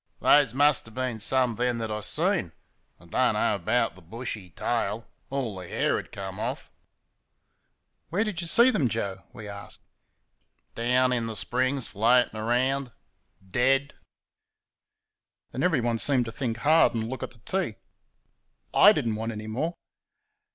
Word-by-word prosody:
"Those 140 -5 +4
muster 145 -4 +3
bin 125 -1 -3
some 125 +2 +1
then 120 +1 0
thet 110 -1 -3
I 105 - -2
seen 105 - 0 0.5
I - - -18
do - - -11
n't - - +3
know - - +1
'bout - - +1
the 95 - -15
bushy 105 +1 -6
tail 115 +3 -2 0.2
all 120 -9 -3
th' 90 - -10
hair - - +1
had - - -7
comed 95 -1 -7
off." - - -4 1.4
"Where'd 205 +6 0 0.2
y' - - -4
see 235 +9 +6
them, 145 - +1
Joe?" 100 -4 -4
we 110 -3 -10
asked. 100 0 -8 0.9
"Down 125 +2 +2
'n 115 -2 -1
th' 110 - -6
springs 130 +1 -1
floating 120 +4 +3
about 125 +4 0 0.5
dead." 135 +7 +2 1.6
Then 130 - -4
everyone 120 -10 +1
seemed 130 -2 +2
to 115 - -5
think 125 -3 -3
hard 155 +2 +4
and 110 -1 -2
look 130 +1 -6
at - - -4
the 120 - -17
tea. 190 - -1 1.0
I - - +8
did - - -1
n't 110 -1 -1
want 115 +1 -3
any 105 0 -7
more. 145 +11 -3
120 Hz, 155 wpm, -27 LUFS, 110-135 Hz, 1.6 s, I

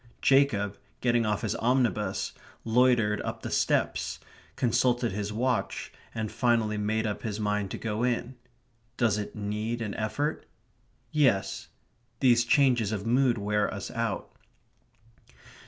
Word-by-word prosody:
Jacob, 120 -8 +3 0.2
getting 120 -2 +2
off 105 -1 0
his - - 0
omnibus, 120 -3 0 0.3
loitered 115 -3 +3
up - - -5
the - - -4
steps, - - 0 0.4
consulted 120 0 +2
his 105 +1 -3
watch, 125 +3 -1 0.2
and 110 -2 -3
finally 115 -3 +1
made 110 +2 0
up 105 -1 -3
his 110 -2 -4
mind 105 -1 0
to - - -5
go 110 -1 -3
in.... 125 0 0 0.6
Does 110 -3 +2
it 105 - -6
need 105 +3 -3
an 105 -3 -3
effort? 145 +8 -2 0.6
Yes. 100 -11 +1 0.5
These 120 -2 +4
changes 120 -5 +3
of 105 -1 -3
mood 125 +1 +3
wear 105 0 0
us 100 -2 -5
out. 115 -6 -3
115 Hz, 130 wpm, -28 LUFS, 105-120 Hz, 0.6 s, These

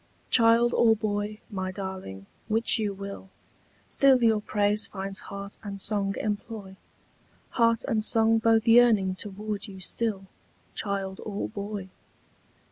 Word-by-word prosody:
Child 230 +1 +5
or 225 -1 +5
boy, 210 0 -3
my 190 -2 -3
darling, 185 - -7 0.2
which 225 +1 +1
you 210 -2 0
will, 200 0 -8 0.6
Still 265 -3 +4
your 220 -2 +3
praise 210 0 +2
finds 195 0 -5
heart 200 0 -8
and 200 -2 -7
song 200 -1 0
employ, 205 -2 -4 0.8
Heart 230 -1 +2
and 215 -1 0
song 225 0 +3
both 225 0 +3
yearning 225 -5 +5
toward 205 +2 -6
you 190 -2 -10
still, 200 0 -2 0.5
Child 195 -2 -3
or 205 -1 -3
boy. 200 -2 -6
205 Hz, 125 wpm, -27 LUFS, 195-225 Hz, 0.8 s, Child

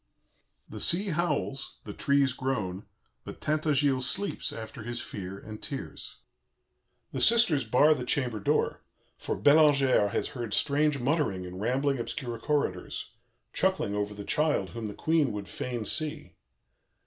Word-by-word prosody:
"The - - -8
sea 195 +4 +2
howls, 155 -5 -1
the - - -7
trees 140 -2 +2
groan, 105 -8 -3 0.4
but - - -9
Tintagiles 145 -4 +2
sleeps 200 +8 -2
after 115 +2 -8
his 120 +2 -4
fear 100 -6 -6
and 110 +1 -9
tears. - - -6 0.9
The - - -2
sisters 210 - +5
bar 135 +7 +5
the 130 -4 -4
chamber 125 -3 -1
door, 100 - 0 0.4
for - - -3
Bellangère 140 -7 +5
has 110 - -1
heard 120 -7 -3
strange 150 0 +2
muttering 130 - 0
in 90 +1 -8
rambling, 135 +5 +1
obscure 120 -1 -4
corridors, 115 -10 -2 0.4
chuckling 190 - +1
over 105 0 -2
the 100 0 -7
child 150 - +1
whom 115 +3 -5
the 105 - -7
Queen 155 -7 +1
would 100 -1 -5
fain 120 -3 -4
see. 155 +4 -3
130 Hz, 140 wpm, -29 LUFS, 110-150 Hz, 0.9 s, sisters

